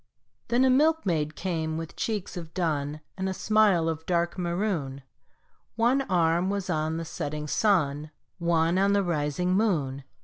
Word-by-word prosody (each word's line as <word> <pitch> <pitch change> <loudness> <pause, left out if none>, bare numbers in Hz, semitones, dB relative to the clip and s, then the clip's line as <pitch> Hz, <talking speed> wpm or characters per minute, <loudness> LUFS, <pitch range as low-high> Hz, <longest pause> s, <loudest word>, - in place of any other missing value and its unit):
Then 245 +2 +3
a 260 - +4
milkmaid 255 - +2
came 160 -4 -2
with 165 0 -6
cheeks 215 -5 -3
of 165 -2 -8
dun 155 -4 -1 0.2
And 190 0 -1
a 190 - -3
smile 210 -7 +3
of 160 -1 -2
dark 170 -1 0
maroon, 170 -7 -2 0.7
One 240 +4 +3
arm 175 0 +2
was 200 -2 -2
on 160 0 -1
the 165 - -4
setting 150 -1 -4
sun, 150 -5 +1 0.3
One 170 +1 +2
on 200 +1 +3
the 200 0 +3
rising 170 +1 0
moon. 155 -10 0
170 Hz, 150 wpm, -27 LUFS, 155-195 Hz, 0.7 s, a